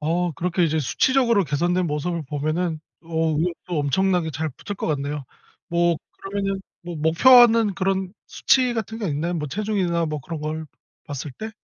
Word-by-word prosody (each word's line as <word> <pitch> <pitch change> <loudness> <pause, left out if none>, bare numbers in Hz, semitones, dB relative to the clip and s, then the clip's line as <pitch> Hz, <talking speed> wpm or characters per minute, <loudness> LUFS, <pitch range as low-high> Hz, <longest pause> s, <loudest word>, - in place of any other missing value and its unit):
어 170 +3 0
그렇게 180 +2 0
이제 160 -1 +1
수치적으로 235 - +2
개선된 175 +5 0
모습을 160 +2 -2
보면은 155 +3 -1 0.2
어 165 -1 0
의욕도 170 0 -2
엄청나게 175 +3 +1
잘 155 +3 -2
붙을 200 +9 -7
것 - - -3
같네요. 145 -1 -2 0.4
뭐 170 -1 +2 0.2
그러면은 195 0 -3 0.2
뭐 175 -1 -6
목표하는 225 +6 +6
그런 190 0 -1
수치 255 -2 +2
같은 225 0 -4
게 205 -5 -2
있나요? 160 +5 -1
뭐 150 -3 -3
체중이나 180 -2 0
뭐 150 -1 -3
그런 160 +3 -6
걸 155 +1 -4 0.4
봤을 145 0 -5
때? 220 - -7
170 Hz, 345 characters per minute, -23 LUFS, 155-195 Hz, 0.4 s, 목표하는